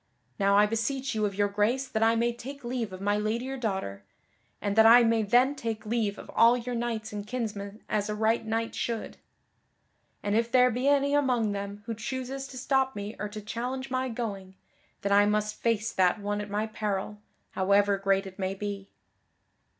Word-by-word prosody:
Now 200 0 +4
I 205 - +6
beseech 260 +5 -1
you 215 -1 +1
of 200 - -6
your 205 0 +2
grace 215 +7 0
that 220 -3 -2
I 225 +1 +4
may 235 +1 +1
take 275 +4 -9
leave 240 -3 -3
of 185 0 -8
my 205 +1 +1
lady 220 +4 -1
your 270 +1 -4
daughter, 190 - -3 0.6
and 200 -1 -2
that 220 0 +7
I 240 +2 +8
may 225 -1 +3
then 245 +6 +4
take 230 -5 -4
leave 215 -2 -1
of - - -10
all 235 +2 +5
your 245 +1 -4
knights 230 -3 -3
and 205 0 -5
kinsmen 210 -3 -5
as 210 -1 -1
a 210 - -1
right 220 +2 +1
knight 225 +1 -2
should. 230 -2 -3 1.1
And 205 0 0
if 230 +1 +1
there 250 -1 +5
be 250 +4 -1
any 280 0 +3
among 250 -7 +2
them 200 +1 -5
who 230 - -3
chooses 260 +4 -5
to 265 - -10
stop 265 0 +1
me 205 +1 -5
or 210 +1 -3
to 215 +1 -7
challenge 250 +5 -4
my 260 0 0
going, 200 -5 -5 0.5
then 200 - -1
I 205 +1 +6
must 210 0 -1
face 225 -1 +1
that 185 +2 +3
one 205 0 -2
at 205 - -7
my 210 +2 -1
peril, 210 -1 -3 0.3
however 200 +1 +2
great 195 0 +1
it 190 0 -10
may 190 0 -1
be." 200 -1 -5
220 Hz, 200 wpm, -28 LUFS, 205-240 Hz, 1.1 s, I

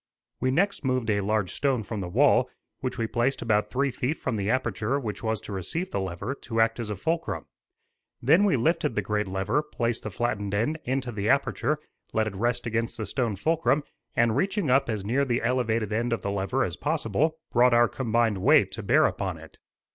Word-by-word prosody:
We 130 - +1
next 195 +9 +1
moved 130 -4 0
a 100 -1 +1
large 105 -1 0
stone 135 -5 0
from 105 0 -5
the 90 - -4
wall, 125 +3 +4 0.3
which 130 -1 -3
we 115 - 0
placed 120 +4 0
about 105 -2 +1
three 140 +1 0
feet 130 +6 -2
from 125 - -2
the 100 -1 -1
aperture 130 0 0
which 110 -6 -5
was 110 -1 -1
to 105 - -8
receive 160 - -3
the - - -1
lever, 95 +6 -3
to 115 -2 -3
act 115 +1 +3
as 115 -2 -4
a 105 - -2
fulcrum. 165 - -2 0.7
Then 160 +11 +4
we 200 -6 +3
lifted 160 -1 +1
the 105 - 0
great 105 +1 -1
lever, 95 +9 0
placed 120 -6 -2
the 110 - -5
flattened 100 -2 -2
end 150 +10 0
into 130 -1 -1
the 105 -1 -2
aperture, 140 +2 +1 0.4
let 110 0 +2
it 105 -2 -4
rest 120 +4 -1
against 115 0 -1
the 110 - -3
stone 115 -1 -1
fulcrum, 155 - +1 0.3
and 115 -2 +3
reaching 195 -7 0
up 135 0 +3
as 105 -3 -2
near 130 +7 +2
the 120 -3 0
elevated 115 -3 0
end 115 +2 0
of 115 - -2
the 100 - -1
lever 100 +7 0
as - - -3
possible, 150 +1 0
brought 120 0 +5
our 120 0 +6
combined 115 -5 0
weight - - +5
to - - -5
bear - - +4
upon - - -2
it. - - -14
120 Hz, 210 wpm, -26 LUFS, 105-135 Hz, 0.7 s, our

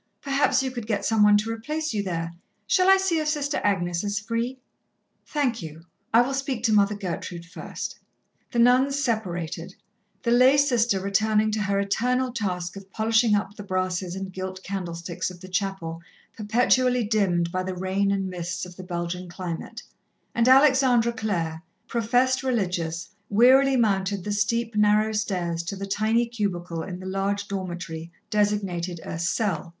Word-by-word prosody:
Perhaps 275 -1 +2
you 260 - -2
could 240 -4 -6
get 210 -3 -1
some 220 -1 +2
one 210 0 +7
to 215 +2 -2
replace 305 +7 -3
you 210 - 0
there. 165 -3 -3 0.3
Shall 370 0 +3
I 385 - +8
see 380 -4 +1
if 310 - -2
Sister 295 -1 -1
Agnes 175 -3 0
is 205 0 -1
free?" 230 +5 -2 0.7
"Thank 265 -8 0
you, 160 0 -9 0.3
I 230 - +6
will 270 +2 -3
speak 270 -4 -2
to 225 -3 +3
Mother 205 0 +4
Gertrude 180 -3 -5
first." 180 - -7 0.5
The - - -3
nuns 255 +4 +4
separated, 185 - -2 0.5
the 235 - +1
lay 255 +3 +6
sister 240 -8 +3
returning 215 +2 +2
to 215 0 -1
her 200 -1 +1
eternal 250 +6 0
task 180 -6 -3
of 195 -1 -10
polishing 220 +1 +2
up 205 0 -2
the 210 - -8
brasses 185 -2 -2
and 190 -1 -6
gilt 185 0 -6
candlesticks 175 -2 -4
of 180 -1 -11
the 185 - -10
chapel 185 -4 -3 0.3
perpetually 245 +3 +2
dimmed 190 -6 +1
by 185 - -1
the 185 0 -4
rain 190 +2 0
and 195 -1 0
mists 180 0 -4
of 180 -1 -12
the 185 - -8
Belgian 175 0 -4
climate, 170 -1 -6 0.5
and 235 0 +2
Alexandra 260 -3 +5
Clare, 170 -8 -2 0.3
professed 250 +2 +2
religious, 180 -9 -1 0.2
wearily 260 +5 +5
mounted 200 -4 +1
the 210 - -3
steep, 225 +2 0
narrow 210 +1 +3
stairs 180 -6 -1
to 170 +4 -5
the 195 0 -5
tiny 220 +4 +1
cubicle 180 -8 -3
in 180 +2 -6
the 185 - -9
large 195 +1 -1
dormitory, 170 -4 -5 0.2
designated 195 -5 0
a 165 - -5
"cell." 175 -1 -1
205 Hz, 165 wpm, -25 LUFS, 180-235 Hz, 0.7 s, I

